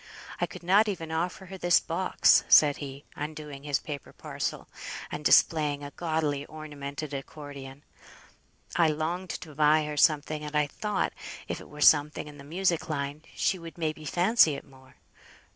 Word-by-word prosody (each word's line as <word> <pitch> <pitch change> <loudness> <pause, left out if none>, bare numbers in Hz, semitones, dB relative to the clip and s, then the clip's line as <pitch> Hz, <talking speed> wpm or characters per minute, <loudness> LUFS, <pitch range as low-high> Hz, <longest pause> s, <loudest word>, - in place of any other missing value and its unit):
I - - +1
could - - -11
not 200 +5 +4
even 165 -6 -4
offer 175 +4 -2
her 190 0 -9
this 175 -1 +4
box," 180 +3 +3
said 145 -2 +7
he, 140 -1 -8
undoing 150 -2 -6
his 145 -1 0
paper 145 -4 -7
parcel - - -5 0.4
and 150 - -5
displaying 150 -2 +4
a 145 - -7
gaudily 155 -3 -1
ornamented 145 -1 -7
accordion; 140 -1 -8 0.9
"I 170 -2 +4
longed 165 +4 -2
to 155 -4 -6
buy 150 +1 +4
her 150 0 -5
something, 150 0 +2
and 150 0 -6
I 150 0 +3
thought, 210 +8 -2 0.3
if - - -4
it - - -13
were 150 0 -10
something 150 0 +4
in 145 -1 -12
the - - -10
music 170 +3 -1
line, 145 0 -3
she 190 - +1
would 165 0 -10
may 160 -2 -1
be 155 - -13
fancy 175 0 +4
it - - -9
more. 130 -2 -19
150 Hz, 170 wpm, -28 LUFS, 145-165 Hz, 0.9 s, said